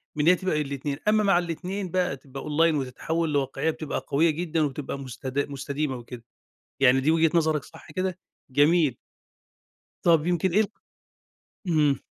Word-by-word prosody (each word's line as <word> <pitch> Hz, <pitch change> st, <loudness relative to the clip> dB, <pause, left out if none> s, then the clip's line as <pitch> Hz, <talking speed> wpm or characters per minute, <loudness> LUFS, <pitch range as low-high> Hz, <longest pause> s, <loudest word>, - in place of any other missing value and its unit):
من 150 Hz, -, 0 dB
إن 160 Hz, -, +5 dB
هي 180 Hz, -, +7 dB
تبقى 165 Hz, -4 st, -1 dB
الاتنين، 140 Hz, 0 st, -3 dB
أمّا 215 Hz, 0 st, +4 dB
مع 195 Hz, -3 st, +4 dB
الاتنين 180 Hz, +2 st, -4 dB
بقى 180 Hz, -7 st, 0 dB
تبقى 135 Hz, 0 st, -9 dB
Online 160 Hz, +2 st, +2 dB
وتتحوّل 150 Hz, +4 st, -2 dB
لواقعية 140 Hz, +1 st, 0 dB
بتبقى 155 Hz, -1 st, -5 dB
قوية 160 Hz, +4 st, +3 dB
جدًا 165 Hz, +1 st, -1 dB
وبتبقى 140 Hz, -1 st, -3 dB
مستدا 130 Hz, +1 st, -3 dB
مستديمة 140 Hz, 0 st, -3 dB
وكده، 120 Hz, 0 st, -10 dB, 0.6 s
يعني 135 Hz, 0 st, +5 dB
دي 145 Hz, +4 st, +2 dB
وجهة 165 Hz, 0 st, +4 dB
نظرك، 155 Hz, -3 st, +2 dB
صح -, -, -14 dB
كده؟ 185 Hz, +3 st, -2 dB, 0.3 s
جميل. 145 Hz, -1 st, +3 dB, 1.1 s
طب 165 Hz, -3 st, +4 dB
يمكن 175 Hz, +1 st, +1 dB
إيه 205 Hz, +5 st, +4 dB
ال 215 Hz, -, 0 dB, 1.0 s
اهم. 150 Hz, -5 st, +3 dB
155 Hz, 160 wpm, -26 LUFS, 140-170 Hz, 1.1 s, هي